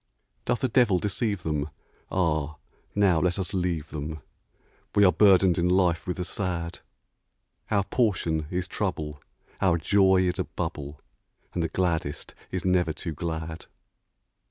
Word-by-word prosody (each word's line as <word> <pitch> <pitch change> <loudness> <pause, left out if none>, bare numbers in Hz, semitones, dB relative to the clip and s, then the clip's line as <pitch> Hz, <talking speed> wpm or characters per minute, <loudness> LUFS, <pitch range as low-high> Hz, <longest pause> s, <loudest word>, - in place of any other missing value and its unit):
Doth 125 - 0
a - - +4
devil 115 -5 +4
deceive 100 0 -1
them? 75 -1 -1 0.4
Ah, 80 -4 0 0.4
now 95 -5 +4
let 90 +2 +1
us 95 0 -3
leave 85 -4 -1
them 75 +1 -5 0.8
We 100 - +6
are 90 - +7
burdened 95 -4 +5
in 90 +1 +2
life 90 -2 +2
with 90 - -2
the 90 - -2
sad; 85 -3 -3 0.9
Our 100 -2 +2
portion 85 -9 0
is 90 0 -2
trouble, 75 -8 -3 0.4
our 90 -3 +4
joy 95 +2 +4
is 90 0 -1
a - - 0
bubble, 75 0 -5 0.5
And 90 - -1
the 80 - 0
gladdest 80 -5 -1 0.2
is 90 -1 -3
never 90 -3 +2
too 80 +2 -4
glad. 80 0 -5
90 Hz, 145 wpm, -27 LUFS, 80-95 Hz, 0.9 s, are